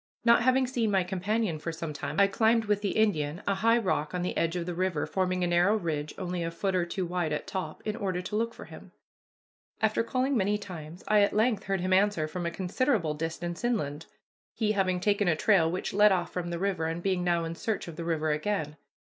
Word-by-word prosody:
Not 235 Hz, +1 st, +6 dB
having 255 Hz, +2 st, +3 dB
seen 245 Hz, -3 st, 0 dB
my 190 Hz, -2 st, +2 dB
companion 190 Hz, -1 st, -1 dB
for 165 Hz, -, -4 dB
some 165 Hz, -1 st, -5 dB
time, 150 Hz, -, -4 dB
I 200 Hz, -, +7 dB
climbed 220 Hz, +3 st, +2 dB
with 205 Hz, -1 st, +1 dB
the 200 Hz, -, -1 dB
Indian 175 Hz, -6 st, +1 dB
a 200 Hz, -, +3 dB
high 225 Hz, +4 st, +3 dB
rock 185 Hz, -7 st, -1 dB
on 180 Hz, -, -1 dB
the 180 Hz, -, -2 dB
edge 165 Hz, +1 st, 0 dB
of 175 Hz, -1 st, -2 dB
the 180 Hz, -, -3 dB
river 180 Hz, -3 st, -1 dB
forming 185 Hz, -1 st, -1 dB
a -, -, +2 dB
narrow 175 Hz, +4 st, +3 dB
ridge 155 Hz, -6 st, -3 dB
only 180 Hz, -2 st, -3 dB
a 165 Hz, -, -1 dB
foot 190 Hz, +3 st, -2 dB
or 175 Hz, -1 st, +1 dB
two 185 Hz, +1 st, -2 dB
wide 175 Hz, -2 st, -1 dB
at 150 Hz, -, -2 dB
top, 185 Hz, -5 st, -5 dB
in 215 Hz, -1 st, -2 dB
order 190 Hz, -4 st, -2 dB
to 185 Hz, +3 st, -5 dB
look 230 Hz, +1 st, -1 dB
for -, -, -10 dB
him. -, -, -13 dB, 0.9 s
After 220 Hz, +1 st, +2 dB
calling 260 Hz, +4 st, 0 dB
many 205 Hz, -1 st, +2 dB
times 175 Hz, -4 st, -9 dB
I 210 Hz, 0 st, +4 dB
at 200 Hz, -, +2 dB
length 220 Hz, 0 st, +2 dB
heard 195 Hz, -2 st, -1 dB
him 185 Hz, +1 st, +1 dB
answer 190 Hz, -5 st, +3 dB
from 170 Hz, +2 st, -4 dB
a -, -, +1 dB
considerable 185 Hz, -, 0 dB
distance 165 Hz, +4 st, -4 dB
inland, 165 Hz, -11 st, -1 dB, 0.5 s
he 215 Hz, -2 st, +1 dB
having 185 Hz, -3 st, +1 dB
taken 205 Hz, +1 st, +1 dB
a 165 Hz, -, +3 dB
trail 175 Hz, -2 st, +3 dB
which 180 Hz, +2 st, -3 dB
led 210 Hz, +1 st, +6 dB
off 185 Hz, -2 st, 0 dB
from 175 Hz, -1 st, -3 dB
the 170 Hz, -, -3 dB
river, 185 Hz, -3 st, -1 dB
and 165 Hz, +1 st, -4 dB
being 185 Hz, -2 st, 0 dB
now 170 Hz, -1 st, +1 dB
in 165 Hz, 0 st, -3 dB
search 215 Hz, +4 st, -3 dB
of 170 Hz, -, -7 dB
the 170 Hz, -, -5 dB
river 160 Hz, -2 st, 0 dB
again. 150 Hz, -1 st, -2 dB
185 Hz, 235 wpm, -28 LUFS, 170-210 Hz, 0.9 s, I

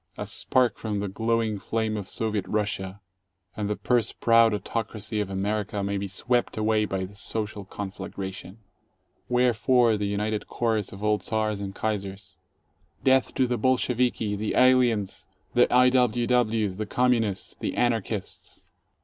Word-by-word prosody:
A -, -, -4 dB
spark 125 Hz, -2 st, +1 dB
from 105 Hz, -2 st, -2 dB
the 100 Hz, -, -2 dB
glowing 110 Hz, +1 st, 0 dB
flame 110 Hz, +1 st, -1 dB
of 100 Hz, -3 st, -4 dB
Soviet 110 Hz, -3 st, -2 dB
Russia, 100 Hz, -2 st, -2 dB, 0.6 s
and 105 Hz, -1 st, -2 dB
the 105 Hz, -, 0 dB
purse 120 Hz, -1 st, +1 dB
proud 115 Hz, -1 st, +4 dB
autocracy 110 Hz, +1 st, -3 dB
of 105 Hz, -2 st, -2 dB
America 100 Hz, +1 st, -2 dB
may 100 Hz, 0 st, -1 dB
be 100 Hz, 0 st, -3 dB
swept 120 Hz, +6 st, -1 dB
away 110 Hz, 0 st, +2 dB
by 95 Hz, -2 st, -2 dB
the 95 Hz, -, -12 dB
social 105 Hz, -1 st, -4 dB
conflagration. 95 Hz, 0 st, -7 dB, 0.7 s
Wherefore 125 Hz, -1 st, +3 dB
the 105 Hz, 0 st, -1 dB
united 105 Hz, +1 st, -2 dB
chorus 110 Hz, -4 st, -1 dB
of 100 Hz, +1 st, -9 dB
all 105 Hz, 0 st, +2 dB
Czars 110 Hz, -2 st, -1 dB
and 95 Hz, -1 st, -5 dB
Kaisers, 100 Hz, -2 st, -4 dB, 0.6 s
"Death 130 Hz, -1 st, +3 dB
to 130 Hz, -, +3 dB
the 120 Hz, -2 st, -1 dB
Bolsheviki, 125 Hz, -3 st, +1 dB
the 105 Hz, +1 st, -2 dB
aliens, 125 Hz, -6 st, +3 dB, 0.3 s
the 120 Hz, -, +4 dB
I. 125 Hz, +1 st, +6 dB
W. 125 Hz, -2 st, +2 dB
Ws., 110 Hz, -5 st, +1 dB
the 110 Hz, 0 st, -3 dB
Communists, 115 Hz, -5 st, 0 dB
the -, -, -3 dB
Anarchists 115 Hz, -4 st, -2 dB
110 Hz, 150 wpm, -26 LUFS, 100-120 Hz, 0.7 s, I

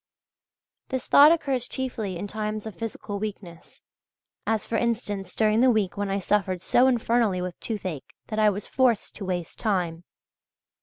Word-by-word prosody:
This 260 Hz, -2 st, -3 dB
thought 290 Hz, +2 st, +8 dB
occurs 275 Hz, -7 st, 0 dB
chiefly 220 Hz, -8 st, -3 dB
in 195 Hz, -, -4 dB
times 215 Hz, +1 st, -4 dB
of 220 Hz, -, -6 dB
physical 205 Hz, 0 st, -5 dB
weakness, 195 Hz, -5 st, -8 dB, 0.6 s
as 220 Hz, -1 st, +1 dB
for 230 Hz, -, -3 dB
instance, 210 Hz, -5 st, -1 dB
during 215 Hz, +1 st, +3 dB
the 260 Hz, -, +6 dB
week 215 Hz, -6 st, +1 dB
when 205 Hz, -1 st, -2 dB
I 195 Hz, -, 0 dB
suffered 195 Hz, -1 st, 0 dB
so 250 Hz, +6 st, +4 dB
infernally 230 Hz, -5 st, +2 dB
with 180 Hz, -1 st, -5 dB
toothache 185 Hz, -, -5 dB
that 215 Hz, -, -2 dB
I 215 Hz, -1 st, +5 dB
was 205 Hz, 0 st, -4 dB
forced 250 Hz, -5 st, +1 dB
to 200 Hz, -, -6 dB
waste 175 Hz, -3 st, -4 dB
time. 175 Hz, -6 st, -1 dB
210 Hz, 160 wpm, -26 LUFS, 190-230 Hz, 0.6 s, thought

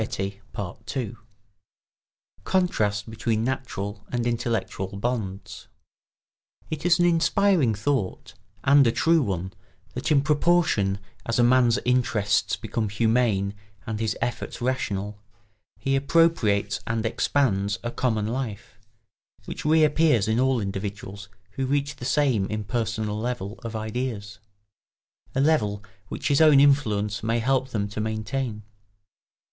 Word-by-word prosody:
[Sidenote: 100 Hz, +3 st, -5 dB, 1.3 s
Contrast 105 Hz, -, 0 dB
between 110 Hz, 0 st, -1 dB
natural 105 Hz, -5 st, -4 dB
and 120 Hz, -1 st, -1 dB
intellectual 115 Hz, -5 st, -1 dB
bonds.] 100 Hz, -4 st, -4 dB, 1.0 s
It 155 Hz, +2 st, -2 dB
is 175 Hz, -, +5 dB
an 175 Hz, -, +3 dB
inspiring 170 Hz, -, +3 dB
thought, 110 Hz, -2 st, -2 dB, 0.3 s
and 140 Hz, -1 st, +6 dB
a -, -, +4 dB
true 165 Hz, +6 st, +3 dB
one, 95 Hz, -5 st, -3 dB, 0.4 s
that -, -, -3 dB
in 140 Hz, -2 st, +4 dB
proportion 150 Hz, -, +2 dB, 0.3 s
as 115 Hz, -, 0 dB
a 120 Hz, -, +4 dB
man's 120 Hz, -1 st, +4 dB
interests 110 Hz, -4 st, +1 dB
become 110 Hz, -3 st, -3 dB
humane 110 Hz, -2 st, +1 dB, 0.3 s
and 110 Hz, -1 st, -4 dB
his 110 Hz, -1 st, -1 dB
efforts 120 Hz, 0 st, -3 dB
rational, 105 Hz, -5 st, -2 dB, 0.6 s
he 135 Hz, 0 st, 0 dB
appropriates 135 Hz, -9 st, +2 dB
and 115 Hz, 0 st, -1 dB
expands 110 Hz, -4 st, +1 dB
a 120 Hz, -, -3 dB
common 110 Hz, -5 st, 0 dB
life, 110 Hz, -3 st, -5 dB, 0.7 s
which -, -, -7 dB
reappears 155 Hz, -6 st, +4 dB
in 110 Hz, +2 st, +1 dB
all 130 Hz, -1 st, +2 dB
individuals 100 Hz, 0 st, -5 dB, 0.2 s
who 135 Hz, +4 st, -3 dB
reach 140 Hz, +1 st, -1 dB
the 125 Hz, -, -7 dB
same 130 Hz, -7 st, +2 dB
impersonal 110 Hz, 0 st, -2 dB
level 110 Hz, -3 st, -4 dB
of 115 Hz, -1 st, -5 dB
ideas—a 110 Hz, -1 st, -3 dB, 1.1 s
level 105 Hz, -10 st, +1 dB, 0.2 s
which -, -, -3 dB
his 140 Hz, +1 st, +3 dB
own 155 Hz, -3 st, +7 dB
influence 110 Hz, -8 st, +2 dB
may 115 Hz, +1 st, 0 dB
help 130 Hz, +2 st, +1 dB
them 105 Hz, -5 st, -1 dB
to 105 Hz, +1 st, -5 dB
maintain. 110 Hz, +1 st, -3 dB
115 Hz, 120 wpm, -25 LUFS, 105-135 Hz, 1.3 s, own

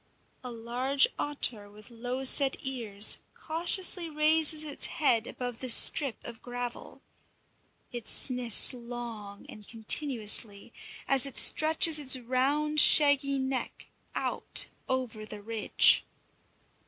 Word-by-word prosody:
A 250 Hz, -, -9 dB
large 245 Hz, +4 st, -1 dB
otter 240 Hz, -8 st, -1 dB
with 210 Hz, +2 st, -17 dB
low 245 Hz, +3 st, -8 dB
set 270 Hz, +1 st, +3 dB
ears 225 Hz, -6 st, +1 dB, 0.2 s
cautiously 345 Hz, +1 st, 0 dB
raises 310 Hz, 0 st, 0 dB
its 295 Hz, -2 st, -4 dB
head 240 Hz, -8 st, -2 dB
above 245 Hz, -2 st, -9 dB
the 255 Hz, -, -5 dB
strip 270 Hz, +2 st, +3 dB
of 235 Hz, -2 st, -12 dB
gravel. 245 Hz, -1 st, -10 dB, 0.9 s
It 240 Hz, -2 st, -9 dB
sniffs 250 Hz, -2 st, +4 dB
long 235 Hz, -4 st, -11 dB
and 210 Hz, -1 st, -16 dB
continuously, 225 Hz, -3 st, -1 dB, 0.3 s
as 275 Hz, 0 st, +1 dB
it 275 Hz, -, -6 dB
stretches 315 Hz, 0 st, +3 dB
its 265 Hz, -3 st, 0 dB
round, 275 Hz, +5 st, -3 dB
shaggy 285 Hz, -2 st, +4 dB
neck 265 Hz, -1 st, -7 dB, 0.3 s
out -, -, 0 dB, 0.2 s
over 255 Hz, -4 st, -6 dB
the 210 Hz, -1 st, -12 dB
ridge. 225 Hz, 0 st, +1 dB
255 Hz, 115 wpm, -26 LUFS, 230-285 Hz, 0.9 s, sniffs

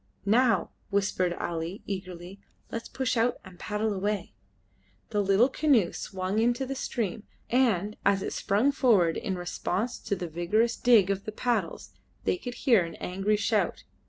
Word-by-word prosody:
"Now," 230 Hz, +3 st, +3 dB, 0.2 s
whispered 195 Hz, -3 st, +1 dB
Ali, 170 Hz, +2 st, -4 dB
eagerly, 185 Hz, -1 st, -6 dB, 0.3 s
"let 230 Hz, -, -3 dB
us -, -, -12 dB
push 260 Hz, -1 st, -1 dB
out 235 Hz, +1 st, +2 dB
and 185 Hz, -2 st, -13 dB
paddle 210 Hz, 0 st, -1 dB
away." 200 Hz, 0 st, -2 dB, 0.8 s
The 210 Hz, -2 st, +1 dB
little 200 Hz, +5 st, +4 dB
canoe 265 Hz, -, +2 dB
swung 190 Hz, +2 st, -3 dB
into 240 Hz, +3 st, +1 dB
the 270 Hz, -, -3 dB
stream, 230 Hz, -6 st, -3 dB, 0.3 s
and 215 Hz, -5 st, +2 dB
as 195 Hz, -1 st, +2 dB
it -, -, -3 dB
sprung 220 Hz, +8 st, +2 dB
forward 205 Hz, -12 st, +3 dB
in 190 Hz, -5 st, -3 dB
response 185 Hz, +6 st, -2 dB
to 205 Hz, -, -2 dB
the 180 Hz, -2 st, -5 dB
vigorous 195 Hz, +9 st, +1 dB
dig 220 Hz, -6 st, +5 dB
of 195 Hz, 0 st, -3 dB
the 215 Hz, -, -4 dB
paddles 240 Hz, +3 st, -2 dB, 0.3 s
they -, -, +1 dB
could 245 Hz, -7 st, -7 dB
hear 230 Hz, -9 st, +6 dB
an 165 Hz, -, -7 dB
angry 195 Hz, +3 st, -1 dB
shout. 210 Hz, -3 st, 0 dB
205 Hz, 160 wpm, -28 LUFS, 185-235 Hz, 0.8 s, hear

